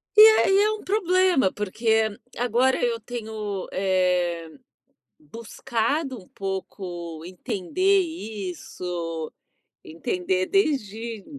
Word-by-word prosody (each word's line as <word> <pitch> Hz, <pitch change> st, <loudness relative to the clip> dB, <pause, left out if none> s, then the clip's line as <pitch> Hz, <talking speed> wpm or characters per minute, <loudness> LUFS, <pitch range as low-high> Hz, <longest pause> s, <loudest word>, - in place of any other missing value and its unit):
E 425 Hz, -, +9 dB
aí 435 Hz, -3 st, +7 dB
é 425 Hz, +1 st, +4 dB
um 430 Hz, -, -7 dB
problema, 370 Hz, -, +3 dB
porque 220 Hz, +2 st, +1 dB, 0.3 s
agora 245 Hz, +2 st, +2 dB
eu 235 Hz, -1 st, +1 dB
tenho, 215 Hz, -4 st, -5 dB
eh, 180 Hz, -3 st, +1 dB, 0.7 s
buscado 255 Hz, +1 st, -2 dB
um 180 Hz, -, -19 dB
pouco 180 Hz, -4 st, -6 dB
entender 220 Hz, -, +1 dB
isso, 180 Hz, -, -5 dB, 0.5 s
entender 180 Hz, +3 st, -1 dB
desde 230 Hz, -, -1 dB
220 Hz, 90 wpm, -25 LUFS, 185-270 Hz, 0.7 s, E